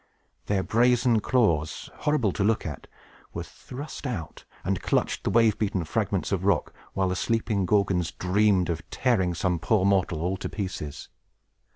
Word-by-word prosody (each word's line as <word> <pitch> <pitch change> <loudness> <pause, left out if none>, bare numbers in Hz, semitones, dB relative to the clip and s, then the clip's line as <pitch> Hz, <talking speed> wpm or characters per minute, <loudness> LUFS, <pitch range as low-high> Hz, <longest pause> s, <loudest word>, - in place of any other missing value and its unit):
Their 100 -2 +1
brazen 120 +1 +3
claws, 85 -12 +1
horrible 150 -9 +1
to 100 - -1
look 110 +2 +1
at, 75 -5 -6 0.5
were - - -3
thrust 140 +2 -8
out, 95 -11 -6 0.2
and - - -1
clutched - - 0
the - - 0
wave 115 -2 +3
beaten 100 -4 0
fragments 80 - -1
of - - 0
rock, - - +1 0.2
while 95 -1 +1
the 90 - -1
sleeping 110 -2 0
Gorgons 95 -4 +2
dreamed 95 -1 +2
of 80 -1 -3
tearing 95 -9 +1
some 90 0 0
poor 95 +3 +2
mortal 95 -5 +1
all 95 +2 -1
to - - -5
pieces. 75 -8 -5
100 Hz, 160 wpm, -26 LUFS, 90-115 Hz, 0.5 s, brazen